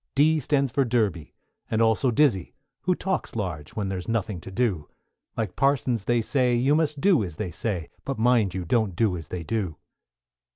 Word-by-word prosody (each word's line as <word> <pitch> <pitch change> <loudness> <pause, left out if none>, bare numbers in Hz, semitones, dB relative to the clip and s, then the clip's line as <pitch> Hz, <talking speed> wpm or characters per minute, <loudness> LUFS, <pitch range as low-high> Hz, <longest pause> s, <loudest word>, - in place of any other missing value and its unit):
=D= 155 +3 +4
stands 140 -2 +1
for 140 - +2
Derby, 110 - -1 0.3
and 110 - 0
also 115 +3 +3
Dizzey, 120 - +2 0.3
Who 180 0 +3
talks 190 -7 -3
large 85 -9 -4
when 105 -3 -2
there's 90 -2 -4
nothing 110 -5 -2
to - - -9
do; 95 -7 -1 0.5
Like 110 -5 -2
parsons 125 -6 +1
they 120 0 +2
say, 125 0 +2
you 130 +4 +3
must 150 -2 +1
do 185 - +4
as 85 -5 -6
they 90 +1 -4
say, 90 -7 -3 0.2
But, 135 - -3
mind 110 -5 +3
you, 90 -2 -3
don't 105 0 +1
do 105 -1 +2
as 80 -4 -7
they 90 -2 -5
do. 95 -5 -2
115 Hz, 190 wpm, -25 LUFS, 95-135 Hz, 0.5 s, =D=